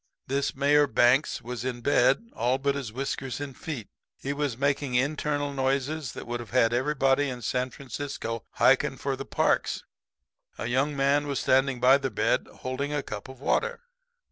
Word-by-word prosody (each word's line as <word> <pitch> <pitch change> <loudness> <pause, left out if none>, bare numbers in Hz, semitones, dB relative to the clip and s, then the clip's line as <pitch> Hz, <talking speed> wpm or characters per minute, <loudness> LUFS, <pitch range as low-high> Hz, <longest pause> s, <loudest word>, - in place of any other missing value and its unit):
"This 135 +1 -1
Mayor 145 +2 +4
Banks 125 +3 +3
was 120 0 -5
in 125 -1 -3
bed 140 - +3
all 125 +3 +1
but 140 +1 0
his 135 -5 -4
whiskers 135 +1 -3
and 140 -2 -6
feet. 140 -10 -6 0.3
He 140 - -3
was 145 -5 -2
making 140 -1 0
internal 145 +2 0
noises 135 +1 -1
that - - -7
would 120 0 -3
have 120 - -8
had 120 -2 +3
everybody 135 +1 +2
in 125 -2 -6
San 125 +4 0
Francisco 130 -4 -5
hiking - - +3
for - - -2
the - - -7
parks. - - +1 0.7
A - - -4
young 135 +5 0
man 140 +2 +2
was 140 -2 -1
standing 135 -1 +2
by 130 +3 +6
the 135 -1 -2
bed - - +1
holding 135 +3 -4
a 145 -1 -1
cup 105 +4 -7
of 130 -1 -11
water. 475 - 0
135 Hz, 175 wpm, -27 LUFS, 125-145 Hz, 0.7 s, by